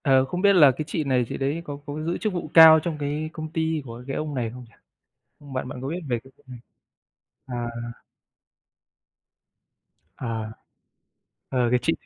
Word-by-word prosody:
Ờ, 135 Hz, -2 st, +4 dB
không 180 Hz, +7 st, -4 dB
biết 200 Hz, 0 st, +5 dB
là 150 Hz, -7 st, +7 dB
cái 150 Hz, +4 st, -5 dB
chị 155 Hz, +1 st, -2 dB
này 130 Hz, -3 st, +1 dB
chị -, -, -4 dB
đấy 140 Hz, +5 st, -1 dB
có 145 Hz, -2 st, -6 dB
có 150 Hz, +2 st, -5 dB
giữ 170 Hz, +2 st, -1 dB
chức 215 Hz, -3 st, -2 dB
vụ 170 Hz, -4 st, -5 dB
cao 160 Hz, -1 st, +10 dB
trong 155 Hz, 0 st, -4 dB
cái 150 Hz, +2 st, -2 dB
công 155 Hz, -1 st, -6 dB
ty 160 Hz, -1 st, -1 dB
của 120 Hz, 0 st, -9 dB
cái 135 Hz, -, -3 dB
ông 150 Hz, -2 st, -3 dB
này 120 Hz, -3 st, -1 dB
không 125 Hz, +2 st, -10 dB
nhỉ? -, -, -26 dB, 0.8 s
Bạn 130 Hz, 0 st, -3 dB
bạn 125 Hz, 0 st, -7 dB
có 135 Hz, -, -4 dB
biết 165 Hz, +5 st, -3 dB
về 120 Hz, -3 st, 0 dB
cái 135 Hz, -, -17 dB
vụ -, -, -27 dB
n 125 Hz, -1 st, -9 dB, 0.9 s
à. 120 Hz, -2 st, -4 dB, 2.5 s
À. 115 Hz, -3 st, -4 dB, 1.0 s
Ờ, 125 Hz, -2 st, +1 dB
cái 125 Hz, -, +4 dB
chị -, -, +2 dB
140 Hz, 190 wpm, -24 LUFS, 125-160 Hz, 2.5 s, cao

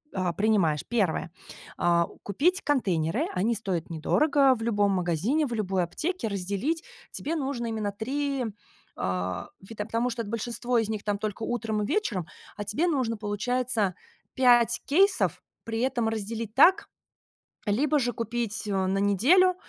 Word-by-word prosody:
а, 185 Hz, -2 st, 0 dB
принимаешь. 190 Hz, -6 st, +2 dB
1, 195 Hz, -8 st, 0 dB, 0.5 s
а, 170 Hz, -1 st, +3 dB, 0.2 s
купить 330 Hz, -, +1 dB
контейнеры- 210 Hz, -, +1 dB
они 220 Hz, +6 st, +1 dB
стоят 185 Hz, -6 st, -3 dB
недорого 275 Hz, -, +3 dB
в 225 Hz, -, -6 dB
любом 205 Hz, -3 st, +2 dB
магазине, 185 Hz, -, +1 dB
в 240 Hz, -, -4 dB
любой 195 Hz, -4 st, 0 dB
аптеке. 310 Hz, -, -3 dB
Разделить 200 Hz, -, -2 dB, 0.3 s
тебе 325 Hz, +3 st, -3 dB
нужно 265 Hz, -5 st, -2 dB
именно 215 Hz, -2 st, -2 dB
3, 270 Hz, +5 st, -2 dB, 0.5 s
а, 90 Hz, 0 st, -2 dB
вита 210 Hz, +1 st, -6 dB
потому 235 Hz, +2 st, 0 dB
что 230 Hz, -1 st, -3 dB
большинство 235 Hz, +3 st, -1 dB
из 220 Hz, -, -1 dB
них- 215 Hz, -2 st, -3 dB
там, 205 Hz, -1 st, -1 dB
только 215 Hz, +1 st, -4 dB
утром 220 Hz, -3 st, -1 dB
и -, -, -1 dB
вечером, 215 Hz, -, -1 dB, 0.3 s
а 205 Hz, -, -3 dB
тебе 240 Hz, -, 0 dB
нужно, 255 Hz, -8 st, 0 dB
получается, 215 Hz, 0 st, -1 dB, 0.4 s
5 240 Hz, -2 st, +4 dB
кейсов, 385 Hz, +8 st, +3 dB, 0.2 s
при 225 Hz, 0 st, -2 dB
этом 245 Hz, -4 st, +1 dB
разделить 220 Hz, 0 st, -4 dB
так 375 Hz, +8 st, +5 dB, 0.8 s
Либо 280 Hz, +8 st, +2 dB
же 245 Hz, -2 st, 0 dB
купить, 230 Hz, -2 st, -3 dB
э, 205 Hz, -, -2 dB
на 190 Hz, -, 0 dB
неделю, 275 Hz, -, +4 dB
225 Hz, 145 wpm, -27 LUFS, 200-260 Hz, 0.8 s, так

